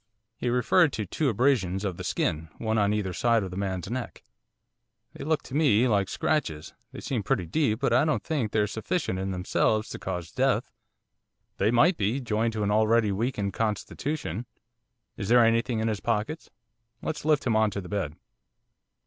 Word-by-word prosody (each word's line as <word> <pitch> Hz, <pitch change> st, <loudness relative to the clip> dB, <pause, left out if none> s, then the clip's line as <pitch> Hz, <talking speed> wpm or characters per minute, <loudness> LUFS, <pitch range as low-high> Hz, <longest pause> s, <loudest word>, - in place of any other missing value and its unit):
He 125 Hz, -, -2 dB
referred 125 Hz, +7 st, +3 dB
to 105 Hz, -, -2 dB
two 140 Hz, -, 0 dB
abrasions 105 Hz, -5 st, +1 dB
of 95 Hz, -3 st, -3 dB
the -, -, -6 dB
skin, 80 Hz, +1 st, -1 dB
one 110 Hz, -1 st, 0 dB
on 100 Hz, 0 st, +3 dB
either 105 Hz, -3 st, -1 dB
side 115 Hz, +2 st, +2 dB
of 95 Hz, -, -5 dB
the -, -, -6 dB
man's 95 Hz, -2 st, -3 dB
neck. 120 Hz, +2 st, -5 dB, 0.9 s
'They -, -, -8 dB
look 155 Hz, -1 st, 0 dB
to -, -, -11 dB
me 130 Hz, -6 st, +4 dB
like 100 Hz, -4 st, +1 dB
scratches. 80 Hz, -, -1 dB, 0.2 s
They -, -, -8 dB
seem 125 Hz, -5 st, -2 dB
pretty 95 Hz, -2 st, 0 dB
deep, 110 Hz, -, 0 dB
but 135 Hz, -4 st, +2 dB
I 130 Hz, +4 st, +5 dB
don't 155 Hz, 0 st, 0 dB
think 135 Hz, -10 st, -1 dB
they're 105 Hz, -1 st, +2 dB
sufficient 110 Hz, -, -2 dB
in 95 Hz, +1 st, -2 dB
themselves 100 Hz, +4 st, 0 dB
to -, -, -7 dB
cause 90 Hz, -3 st, -5 dB
death.' -, -, +1 dB, 0.9 s
'They 100 Hz, -, +2 dB
might 145 Hz, +10 st, +4 dB
be, 110 Hz, +6 st, 0 dB
joined 115 Hz, -2 st, 0 dB
to 110 Hz, -1 st, -2 dB
an 100 Hz, -, +1 dB
already 110 Hz, 0 st, +3 dB
weakened 105 Hz, -1 st, -1 dB
constitution. 115 Hz, -, -3 dB, 0.7 s
Is 100 Hz, -1 st, -4 dB
there 120 Hz, -1 st, +6 dB
anything 115 Hz, +1 st, +2 dB
in 110 Hz, -, 0 dB
his 110 Hz, -2 st, -1 dB
pockets? 115 Hz, +8 st, -2 dB, 0.5 s
let's 155 Hz, -, -3 dB
lift 150 Hz, -1 st, +2 dB
him 115 Hz, -3 st, +2 dB
on 110 Hz, 0 st, +4 dB
to 100 Hz, -, -4 dB
the 90 Hz, -, -8 dB
bed. 90 Hz, -6 st, -3 dB
110 Hz, 185 wpm, -27 LUFS, 100-125 Hz, 0.9 s, there